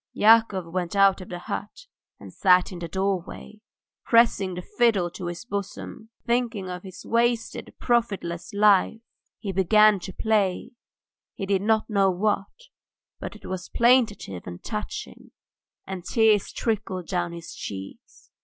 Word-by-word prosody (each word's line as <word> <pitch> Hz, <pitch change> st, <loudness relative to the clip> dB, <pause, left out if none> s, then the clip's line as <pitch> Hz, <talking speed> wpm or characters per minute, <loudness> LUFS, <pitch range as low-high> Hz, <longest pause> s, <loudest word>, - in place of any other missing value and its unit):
Yakov 215 Hz, -4 st, +4 dB
went 180 Hz, 0 st, -2 dB
out 195 Hz, -1 st, +4 dB
of 185 Hz, -, -10 dB
the 180 Hz, -, -5 dB
hut 205 Hz, -, -6 dB, 0.3 s
and -, -, -12 dB
sat 180 Hz, -1 st, +4 dB
in 180 Hz, -, -7 dB
the 170 Hz, -, -5 dB
doorway, 195 Hz, +3 st, -3 dB, 0.4 s
pressing 230 Hz, -6 st, +3 dB
the 180 Hz, -, -5 dB
fiddle 205 Hz, -8 st, +1 dB
to 180 Hz, 0 st, -6 dB
his 175 Hz, +4 st, -6 dB
bosom. 200 Hz, +1 st, -6 dB, 0.2 s
Thinking 235 Hz, -6 st, -1 dB
of 180 Hz, 0 st, -6 dB
his 185 Hz, -1 st, -11 dB
wasted, 235 Hz, 0 st, 0 dB
profitless 200 Hz, -8 st, -1 dB
life, 205 Hz, +1 st, +3 dB, 0.4 s
he 200 Hz, -, -5 dB
began 205 Hz, +2 st, +5 dB
to 190 Hz, -, -7 dB
play, 205 Hz, -2 st, 0 dB, 0.6 s
he 195 Hz, -, -4 dB
did 195 Hz, -1 st, +1 dB
not 220 Hz, +1 st, +1 dB
know 200 Hz, -3 st, +3 dB
what, 195 Hz, +2 st, 0 dB, 0.7 s
but -, -, -7 dB
it -, -, -14 dB
was 185 Hz, -1 st, -5 dB
plaintive 230 Hz, -, +2 dB
and 85 Hz, 0 st, -8 dB
touching, 105 Hz, -2 st, -6 dB, 0.6 s
and 190 Hz, -2 st, -6 dB
tears 215 Hz, -1 st, +2 dB
trickled 200 Hz, -6 st, -3 dB
down 175 Hz, -2 st, -1 dB
his 170 Hz, -1 st, -9 dB
cheeks. 95 Hz, -1 st, -9 dB
195 Hz, 145 wpm, -25 LUFS, 180-220 Hz, 0.7 s, began